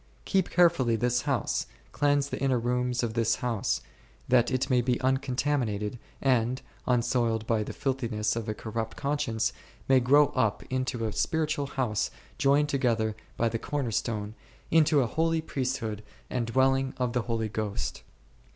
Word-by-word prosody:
Keep 190 -3 +1
carefully 170 -10 +4
this 120 +2 +1
house, 130 -6 0 0.2
cleanse 145 -1 +2
the - - -4
inner 135 -2 +2
rooms 125 +1 0
of 115 -2 -1
this 115 -1 +2
house, 115 -5 -1 0.5
that 120 -1 +4
it 130 0 0
may 125 -2 +3
be 120 0 0
uncontaminated, 130 -4 0 0.2
and, 125 -1 +2 0.3
unsoiled 120 -2 +1
by 115 -1 +1
the 105 - -4
filthi 130 -3 -2
ness 105 -1 0
of 115 -1 -3
a 110 - -2
corrupt 110 0 -4
conscience, 140 -6 0 0.3
may 135 -1 +6
grow 140 +3 +5
up 115 -7 0
unto 130 -2 -1
a 110 - -2
spiritual 155 -1 0
house 120 -6 -1 0.3
joined 145 +1 +4
together 115 -6 +1 0.2
by 115 - +2
the 115 0 -2
Corner 140 -4 -2
stone, 105 -1 -2 0.4
into 155 -2 +5
a - - +2
holy 165 +6 +1
priesthood 130 -8 -3 0.3
and 120 -2 -1
dwelling 135 +2 +2
of 125 -2 -1
the 125 - +1
Holy 115 -1 0
Ghost. 105 -4 -3
125 Hz, 160 wpm, -28 LUFS, 115-135 Hz, 0.5 s, may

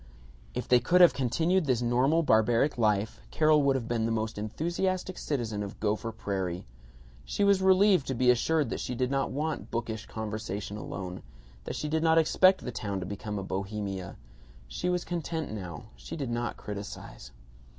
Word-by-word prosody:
If - - -3
they 125 - +6
could 180 +10 +3
have 175 - +8
continued 160 +8 +1
this 125 -2 +2
normal 130 +7 +3
barbaric 115 +2 +3
life 105 -1 +1
Carol 155 -1 +4
would 140 -1 +3
have 120 -4 -2
been 115 -2 0
the - - -1
most 110 -1 -2
enthusiastic 175 - -2
citizen 115 -8 -2
of 100 -1 -6
Gopher 110 +2 -1
Prairie. 95 -5 -3 0.6
She 130 - -1
was 200 -1 +4
relieved 190 -4 +5
to 135 - -1
be 125 +1 +5
assured 150 +5 +1
that - - -2
she 125 - -3
did 125 +1 0
not 135 0 0
want 150 +3 -3
bookish 115 -2 -4
conversation 105 -2 -4
alone; 95 -3 -6 0.4
that - - -4
she 150 - -3
did 160 +1 0
not 160 0 +4
expect 185 +4 +5
the 125 - -4
town 100 -4 -3
to 90 - -4
become 105 +2 -5
a 100 - -3
Bohemia. 95 -1 -4 0.5
She 175 - -3
was 180 -1 0
content 165 -3 -3
now. 90 -7 -6
She - - -8
did 135 -6 -3
not 120 0 -2
criticize. 100 -11 -8
120 Hz, 180 wpm, -29 LUFS, 105-160 Hz, 0.6 s, have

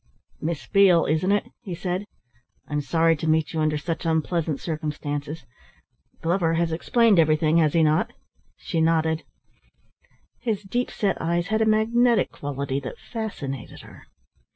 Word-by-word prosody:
"Miss 160 -2 -3
Beale, 195 -5 +5
isn't 160 +6 +1
it?" 205 +4 0
he 190 -7 -6
said. 180 +3 -3 0.6
"I'm 150 0 -1
sorry 165 +2 +2
to 160 - -4
meet 155 0 +1
you 160 - -1
under 155 -1 +1
such 165 +2 -4
unpleasant 160 -2 0
circumstances. 150 -1 -4 0.8
Glover 165 -1 +1
has 170 0 0
explained 215 +4 +3
everything, 155 0 +3
has 155 -3 +3
he 165 - +4
not?" 155 0 +2 0.5
She 165 - -2
nodded. 160 0 +2 1.2
His 215 -4 -2
deep 240 +6 -2
set 200 -3 -1
eyes 170 +2 0
had 220 0 +1
a 220 - +3
magnetic 230 +2 +3
quality 140 -1 -3
that - - -7
fascinated 145 - -6
her. - - -15
165 Hz, 145 wpm, -24 LUFS, 155-195 Hz, 1.2 s, Beale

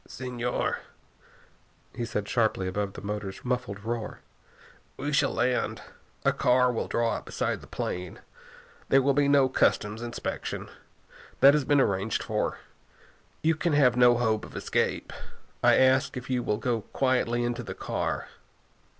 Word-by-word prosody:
"Señor," 125 -1 -2 1.2
he 120 - -2
said 105 -3 -3
sharply 110 -6 +1
above 100 +1 -2
the - - -9
motors' 100 -1 -5
muffled 120 -6 -2
roar, 115 -1 -4 0.8
"we 145 +2 -3
shall 140 - +3
land. 125 +1 0 0.4
A - - +4
car 125 0 +3
will 115 - -2
draw 115 -1 +1
up - - -5
beside - - -2
the - - -13
plane. 90 -1 -4 0.7
There 135 0 +5
will 140 +1 +3
be 145 +1 +3
no 140 -2 +5
customs 105 -3 +1
inspection. 120 0 -5 0.7
That 140 +1 +9
has 150 -2 +1
been 145 +1 +3
arranged 100 -3 0
for. - - -1 0.9
You 160 +1 +4
can 160 0 -1
have 130 -4 +4
no 120 -1 +6
hope 110 -3 +1
of - - -10
escape. - - -1 0.5
I - - +6
ask 130 +1 +3
you - - -2
if 130 +1 -8
you 125 -1 +1
will 105 -3 -1
go 115 0 -1
quietly 125 -1 0
into 120 0 -2
the - - -7
car?" - - -3
120 Hz, 155 wpm, -27 LUFS, 110-130 Hz, 1.2 s, That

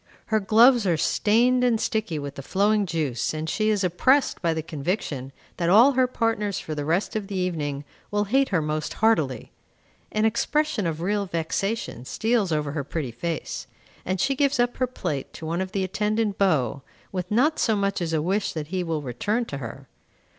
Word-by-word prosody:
Her 220 - +5
gloves 225 +2 +5
are 170 -3 +2
stained 240 +9 +3
and 240 -3 +3
sticky 215 -8 -1
with 145 -1 -5
the 140 - -7
flowing 205 +6 +1
juice, 155 -5 -1
and 155 +1 -3
she 215 +6 +1
is 205 -2 +1
oppressed 255 +11 +2
by 170 -2 +1
the 160 -1 -2
conviction 150 -4 -3 0.3
that 170 -1 0
all 230 +9 +7
her 260 -1 +3
partners 225 -5 -1
for 155 - -5
the 145 -1 -3
rest 170 +8 0
of 210 -2 -2
the 200 - -5
evening 150 -6 -2 0.2
will 205 0 +1
hate 265 +7 +2
her 180 -6 +1
most 155 0 -2
heartily. 155 - +1 0.6
An 215 +1 +1
expression 235 - +1
of 160 0 -3
real 200 +2 0
vexation 175 - -2
steals 220 - 0
over 150 -2 0
her 145 -1 -3
pretty 140 -2 -4
face, 160 +7 -4 0.4
and 185 +1 -2
she 275 +9 +2
gives 280 -1 +1
up 245 0 +1
her 255 - +1
plate 145 - -4
to 160 - -8
one 170 +3 -1
of 190 0 -4
the 195 -2 -1
attendant 210 +2 -1
beaux, 140 - +2 0.3
with 180 -1 -4
not 265 +9 +2
so 220 - +2
much 200 -2 0
as 165 -2 -1
a 155 -2 0
wish 195 +4 0
that 155 -2 -5
he 185 0 -1
will 160 -3 -2
return 215 - -1
to 140 -10 -6
her. 130 +2 -8
190 Hz, 195 wpm, -25 LUFS, 155-220 Hz, 0.6 s, all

